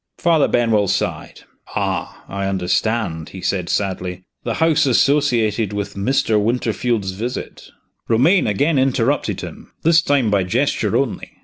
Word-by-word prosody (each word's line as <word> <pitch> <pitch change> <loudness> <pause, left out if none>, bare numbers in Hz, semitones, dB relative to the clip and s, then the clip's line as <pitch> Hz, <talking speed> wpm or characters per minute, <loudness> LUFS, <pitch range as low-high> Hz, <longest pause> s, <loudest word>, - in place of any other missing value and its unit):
Father 165 -4 +3
Benwell 110 -4 +2
sighed. 100 - -2 0.3
"Ah, - - -3
I 100 0 -3
understand!" 95 -2 -1
he 95 - -9
said, 90 -2 -1
sadly. 90 -2 -2 0.2
"The 115 - -2
house 160 -2 +3
associated 120 -6 +2
with 100 -1 -4
Mr. 110 +1 +1
Winterfield's 115 -2 -1
visit 115 +7 -6 0.2
" - - -50
Romayne 140 - +4
again 140 +9 +1
interrupted 130 +1 0
him - - -10
this 165 0 +5
time 140 -8 +1
by 100 -2 +2
gesture 90 - 0
only. - - -3
115 Hz, 135 wpm, -19 LUFS, 100-135 Hz, 0.3 s, this